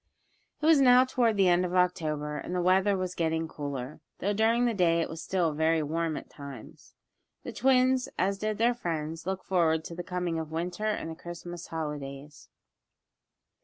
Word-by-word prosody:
It 300 - -3
was 315 -3 +6
now 250 0 +7
toward 240 -4 +1
the 195 -2 +4
end 175 0 +4
of 180 0 -2
October, 155 -5 0
and 180 - -5
the 180 - +1
weather 190 +2 +3
was 185 -1 -3
getting 160 -1 -1
cooler, 140 -3 -6 0.2
though 205 +3 -1
during 225 +3 +3
the 235 - +1
day 170 -4 +3
it 165 - -1
was 165 0 -6
still 175 -5 0
very 160 +1 +2
warm 160 +1 -1
at - - -8
times. 140 -5 -11 0.5
The - - -6
twins, 255 0 +3
as 195 +2 0
did 215 0 -2
their 235 +2 +3
friends, 165 -6 -4
looked 190 -1 -3
forward 160 -4 +2
to - - -7
the 175 - -5
coming 180 -2 -2
of 160 -1 -6
Winter 180 +6 -3
and 210 -6 -2
the - - -7
Christmas 175 0 -8
holidays. 150 -2 -6
175 Hz, 185 wpm, -29 LUFS, 160-200 Hz, 0.5 s, now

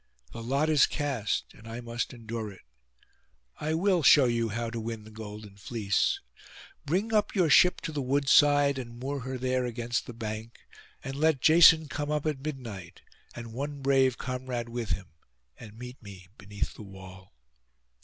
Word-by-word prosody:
The 115 - -7
lot 135 +6 0
is 155 -3 +5
cast, 135 -8 -2
and 115 - -15
I 115 +1 -6
must 120 0 -4
endure 115 -3 -6
it. 95 - -16 1.0
I 155 +1 -1
will 180 +1 +2
show 140 -1 +7
you 115 -1 0
how 115 +2 -3
to 115 - -4
win 110 -1 -5
the 110 - -13
golden 105 -2 -9
fleece. 100 -2 0 0.7
Bring 195 +9 0
up 210 0 +1
your 175 -6 +3
ship 180 +6 +6
to - - -4
the 150 -2 -3
wood 140 +2 0
side, 145 -1 +5
and 120 -2 -8
moor 140 +3 -3
her 130 0 -5
there 130 0 0
against 120 0 -2
the 120 - -7
bank; 110 0 -6 0.5
and 135 0 -5
let 155 -2 +2
Jason 160 +1 +7
come 145 +1 -4
up 150 0 -1
at 150 -3 -1
midnight, 120 - -7 0.3
and 115 -1 -8
one 140 +2 -5
brave 135 -2 +3
comrade 125 -2 -4
with 115 -2 -4
him, 95 -4 -3 0.5
and 110 -2 -12
meet 125 +2 -9
me 95 -4 -12
beneath 100 0 -5
the - - -12
wall. 95 - -12
125 Hz, 175 wpm, -28 LUFS, 110-145 Hz, 1.0 s, show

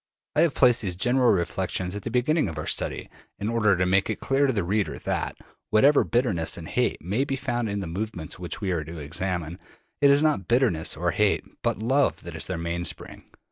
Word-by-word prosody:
I - - +4
have 165 -4 +2
placed 125 -2 +5
these 95 -5 -1
general 120 +6 +3
reflections 90 +1 -1
at 105 - -5
the 115 - -5
beginning 125 - +1
of 80 - -7
our 75 - -4
study, - - -2 0.3
in 105 - -3
order 105 -5 +3
to 90 - +2
make 95 +2 +2
it - - -2
clear 135 +1 +2
to - - +2
the 100 -6 -1
reader 100 +3 -1
that, - - -3 0.3
whatever 140 +7 +5
bitterness 110 -10 0
and - - -8
hate - - -1
may 100 +10 0
be 135 -1 -2
found 120 -4 -2
in 100 0 -2
the - - -4
movements 90 -1 -5
which 90 -3 -5
we 95 -2 -1
are 85 -3 -1
to 80 +3 -9
examine, 85 +2 -3 0.4
it 140 - +6
is 140 +2 +5
not 150 - +1
bitterness 115 -10 +2
or - - 0
hate, - - +2 0.2
but - - 0
love, 130 +6 +1
that 85 -1 -8
is 80 - -2
their 95 - -3
mainspring. 85 +1 -5
100 Hz, 215 wpm, -25 LUFS, 85-125 Hz, 0.4 s, it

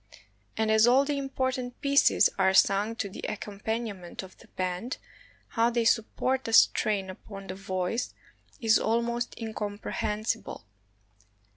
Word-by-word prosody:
And 220 0 +1
as 220 +1 +5
all 260 +3 +5
the 290 0 -1
important 260 -2 -3
pieces 280 0 +4
are 190 0 +3
sung 205 +4 +3
to 210 - -3
the 190 - -10
accompaniment 210 -3 -5
of 185 - -12
the - - -17
band, 185 +6 -3 0.5
how 230 +1 +2
they 235 -1 0
support 250 +4 +1
the 225 - -3
strain 205 -3 +4
upon 195 +1 -10
the 185 - -5
voice 190 +4 -2 0.5
is 225 -4 +4
almost 235 +2 -1
incomprehensible. 215 - -3
220 Hz, 130 wpm, -28 LUFS, 195-240 Hz, 0.5 s, as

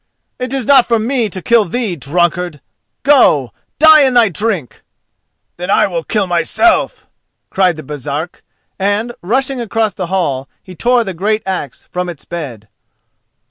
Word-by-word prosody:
"It 255 0 -4
is 270 -3 -2
not 270 -1 +5
for 235 - +2
me 230 0 -1
to 185 -1 -7
kill 235 -2 +4
thee, 215 0 -2
drunkard! 175 +2 -1 0.4
Go, 200 - +4 0.2
die 315 0 +7
in 260 -3 +3
thy 235 -3 +5
drink!" 190 - -3 0.8
"Then 180 +2 -5
I - - +4
will 170 -3 -3
kill 210 +2 0
myself!" 180 - +1 0.5
cried 185 -3 +2
the 155 - -9
Baresark, 150 +4 -5 0.4
and, 205 +5 0
rushing 255 +6 -1
across 225 -2 -1
the 180 -1 -4
hall 145 -8 -2
he 185 - -11
tore 240 +5 +2
the 195 -4 -5
great 210 +5 -1
axe 185 -9 -5
from 180 0 -3
its 165 -5 -9
bed. 135 -11 -7
190 Hz, 155 wpm, -15 LUFS, 170-235 Hz, 0.8 s, die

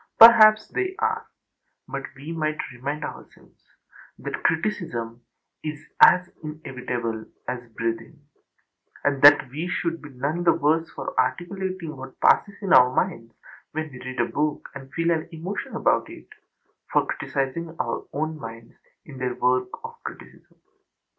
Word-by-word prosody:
Perhaps 215 -2 +9
they 375 0 -2
are; 445 0 -1 0.6
but 135 - -4
we 140 +5 -8
might 155 -2 -1 0.2
remind 140 +5 -4
ourselves - - -12 0.5
that - - -5
criticism 120 - -1 0.4
is 155 -1 -4 0.2
as 180 -1 +7 0.2
inevitable 125 -7 -4 0.2
as 125 -1 -5
breathing, 115 +7 -4 0.8
and 140 -1 +1
that 145 -1 +8
we 155 +6 -3
should 170 -1 -2
be 145 - -10
none 145 +6 -2
the 170 - +5
worse 160 +3 +1
for - - -6
articulating 175 +4 -2
what 130 0 -10
passes 200 -1 +4
in 190 -1 +2
our 125 0 +8
minds 120 -7 -2 0.4
when 155 0 -3
we 125 - -10
read 130 0 -7
a 120 - +3
book 150 +3 -2
and 135 -1 -10
feel 165 +3 +1
an 160 -1 -1
emotion 170 +5 -5
about - - +2
it, - - -12 0.6
for - - +3
criticizing 160 +5 -3
our - - -2
own 155 +2 -3
minds 115 -1 -9 0.3
in 135 -3 -10
their 125 -1 -2
work 125 0 +1
of 465 0 -9
criticism. - - -11
150 Hz, 145 wpm, -25 LUFS, 130-170 Hz, 0.8 s, Perhaps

